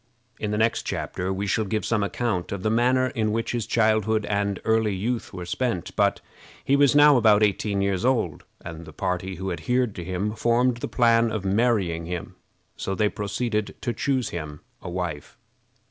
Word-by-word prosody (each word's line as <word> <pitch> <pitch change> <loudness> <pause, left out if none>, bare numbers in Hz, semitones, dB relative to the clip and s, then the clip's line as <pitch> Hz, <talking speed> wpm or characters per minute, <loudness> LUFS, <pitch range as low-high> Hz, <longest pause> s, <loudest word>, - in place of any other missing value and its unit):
In 105 - -2
the 105 - -1
next 110 +1 +2
chapter 90 +1 -3
we 95 +1 -2
shall 105 +3 +1
give 105 +2 -2
some 115 -3 +1
account 100 -3 -2
of 100 -2 -4
the 110 - +1
manner 130 +3 +3
in 110 -3 -1
which 115 +1 -1
his 120 -3 -2
childhood 110 -1 +2
and 100 -1 -1
early 110 -2 +2
youth 115 +5 -2
were 90 -2 -7
spent; 115 0 -2
but - - +2 0.4
he 140 - +3
was 140 -1 +4
now 145 -1 +7
about 110 -3 +5
eighteen 100 -1 +1
years 100 0 0
old, 115 - 0 0.2
and 85 0 -7
the 80 - -12
party 95 +2 -2
who 95 +2 -4
adhered 125 +5 0
to 90 - -6
him 95 +4 -2
formed 120 +2 +2
the - - -4
plan 115 -2 +3
of 105 -3 -3
marrying 95 -6 +1
him. 90 -1 -5 0.4
So 95 - -3
they 105 +1 +2
proceeded 105 +1 -2
to 120 - -2
choose 130 -2 0
him 75 -3 -6 0.2
a - - -6
wife. 85 -5 -5
105 Hz, 190 wpm, -25 LUFS, 95-115 Hz, 0.4 s, now